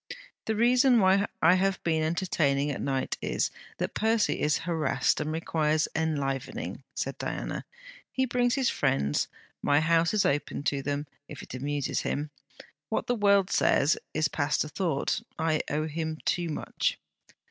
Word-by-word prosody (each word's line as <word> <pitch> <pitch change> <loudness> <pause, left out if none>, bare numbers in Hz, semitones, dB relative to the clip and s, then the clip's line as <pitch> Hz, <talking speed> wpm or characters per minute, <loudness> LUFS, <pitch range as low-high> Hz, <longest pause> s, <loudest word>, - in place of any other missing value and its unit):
'The 220 - 0
reason 245 +2 +5
why 195 +1 +4 0.2
I 165 +2 +7
have 190 +1 +1
been 160 -2 +1
entertaining 155 -4 +1
at 140 - -4
night 135 -1 -1
is, - - 0 0.3
that - - -2
Percy 220 0 +1
is 150 0 +2
harassed 155 -6 +1
and 150 +1 -2
requires 155 -1 +1
enlivening,' 140 -4 -2
said - - -3
Diana. - - -4 0.5
'He 260 - +1
brings 245 -1 +1
his 265 -3 +1
friends. 70 - +1 0.3
My 145 0 +3
house 165 +1 +3
is 210 - +3
open 145 0 -1
to 140 -1 0
them, 145 +1 -2 0.2
if 145 - -9
it - - -10
amuses 140 +2 -2
him. 150 +1 -2 0.6
What - - -1
the 245 - +1
world 200 -4 +3
says, 145 +4 +3 0.2
is 155 0 +1
past 145 -1 0
a 150 - -7
thought. 160 -4 -1 0.2
I 160 -1 +1
owe 155 +2 0
him 160 0 -3
too 175 -1 0
much.' 150 - -1
160 Hz, 160 wpm, -28 LUFS, 145-190 Hz, 0.6 s, I